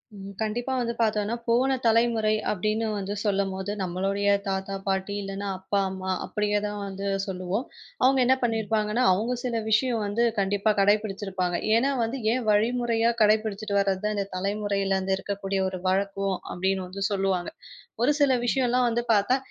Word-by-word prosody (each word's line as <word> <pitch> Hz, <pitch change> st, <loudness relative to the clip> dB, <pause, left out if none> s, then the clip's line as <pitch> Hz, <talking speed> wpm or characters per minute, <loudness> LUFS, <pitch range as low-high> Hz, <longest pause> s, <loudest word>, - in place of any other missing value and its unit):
ம். 195 Hz, 0 st, -9 dB
கண்டிப்பா 235 Hz, +4 st, -2 dB
வந்து 235 Hz, -1 st, -1 dB
பாத்தோம்னா 215 Hz, 0 st, +1 dB
போன 245 Hz, +3 st, +3 dB
தலைமுறை 225 Hz, -1 st, +3 dB, 0.2 s
அப்டின்னு 215 Hz, +3 st, -1 dB
வந்து 200 Hz, 0 st, -3 dB
சொல்லும்போது. 195 Hz, -1 st, -1 dB
நம்மளுடைய 195 Hz, +3 st, 0 dB, 0.2 s
தாத்தா, 195 Hz, 0 st, -2 dB
பாட்டி 190 Hz, +1 st, -1 dB
இல்லன்னா 195 Hz, +1 st, -5 dB
அப்பா, 190 Hz, +2 st, -1 dB
அம்மா 190 Hz, 0 st, -4 dB
அப்டியே 210 Hz, 0 st, 0 dB
தான் 210 Hz, 0 st, -4 dB
வந்து 195 Hz, 0 st, -5 dB, 0.2 s
சொல்லுவோம். 190 Hz, +5 st, -3 dB, 0.4 s
அவங்க 265 Hz, +1 st, +5 dB
என்ன 260 Hz, +2 st, +5 dB
பண்ணிருப்பாங்கன்னா. 220 Hz, 0 st, 0 dB
அவங்க 220 Hz, +7 st, -1 dB
சில 240 Hz, -2 st, -1 dB
விஷயம் 225 Hz, 0 st, +2 dB
வந்து 205 Hz, +4 st, 0 dB, 0.2 s
கண்டிப்பா 200 Hz, +2 st, +2 dB
கடைபிடிச்சிருப்பாங்க. 195 Hz, -3 st, +1 dB, 0.2 s
ஏன்னா 250 Hz, +5 st, +3 dB
வந்து 235 Hz, +4 st, -3 dB
ஏன் 250 Hz, -1 st, -2 dB
வழிமுறையா 230 Hz, +2 st, +2 dB
கடைபிடிச்சிட்டு 215 Hz, -1 st, +1 dB
வர்றதுதான். 200 Hz, +2 st, 0 dB
இந்தத் 200 Hz, -1 st, -3 dB
தலைமுறையில 200 Hz, 0 st, 0 dB, 0.2 s
இருக்கக்கூடிய 195 Hz, 0 st, -3 dB
ஒரு 185 Hz, -1 st, -6 dB
வழக்கம். 195 Hz, 0 st, 0 dB
அப்படின்னு 190 Hz, +1 st, -1 dB
வந்து 195 Hz, +2 st, -8 dB
சொல்லுவாங்க. 190 Hz, -3 st, 0 dB, 0.5 s
ஒரு 250 Hz, -, +4 dB
சில 280 Hz, -2 st, +5 dB
விஷயம்லாம் 250 Hz, -1 st, +2 dB
வந்து 235 Hz, +1 st, 0 dB
பாத்தா, 210 Hz, +5 st, +3 dB
205 Hz, 145 wpm, -26 LUFS, 195-225 Hz, 0.5 s, அவங்க